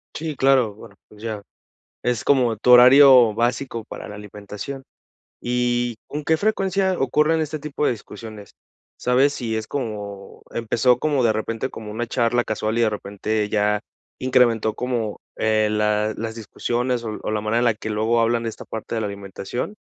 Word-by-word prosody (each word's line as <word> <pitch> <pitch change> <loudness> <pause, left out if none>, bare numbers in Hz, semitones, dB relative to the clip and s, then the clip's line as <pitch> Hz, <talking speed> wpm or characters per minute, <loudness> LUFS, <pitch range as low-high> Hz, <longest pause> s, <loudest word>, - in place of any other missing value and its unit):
Sí, 160 -1 -4
claro 130 -5 +3
bueno, 105 -1 -14
pues, 105 0 -16
ya, 110 -2 -4 0.6
es 120 -2 -1
como 125 -5 +3
tu 120 - +1
horario 125 -2 +8
básico 120 0 -1
para - - -9
la - - -8
alimentación. 105 +6 -8 0.6
Y, 120 -1 0
¿con 150 +1 -5
qué 160 - +3
frecuencia 195 -2 0
ocurren 150 +5 +2
este 155 0 -3
tipo 150 0 -3
de - - +3
discusiones? 110 -2 -9 0.5
¿Sabes 130 +4 +3
sí 115 -3 -3
es 110 -1 -3
como, 105 -7 -6
empezó 115 +2 +2
como 145 -1 +1
de 115 - +4
repente 115 +3 -3
como 110 -1 -8
una 115 +2 -3
charla 120 0 +1
casual 110 0 -2
y - - +3
de 115 - +3
repente 105 +1 -2
ya 105 0 +1 0.4
incrementó 120 -4 +2
como, 115 -3 -3 0.2
eh, 110 -1 +2
la 105 0 +1
las 110 0 -4
discusiones 120 +2 -2
o 110 -2 -5
o - - -4
la 110 - 0
manera 110 +2 0
en 120 - +1
la 115 - +4
que 110 0 -5
luego 110 +2 +1
hablan 115 0 +1
de 115 - -2
esta 110 - -10
parte 110 +1 -6
de 110 - -1
la 105 - -1
alimentación? 100 - -6
115 Hz, 180 wpm, -22 LUFS, 110-125 Hz, 0.6 s, horario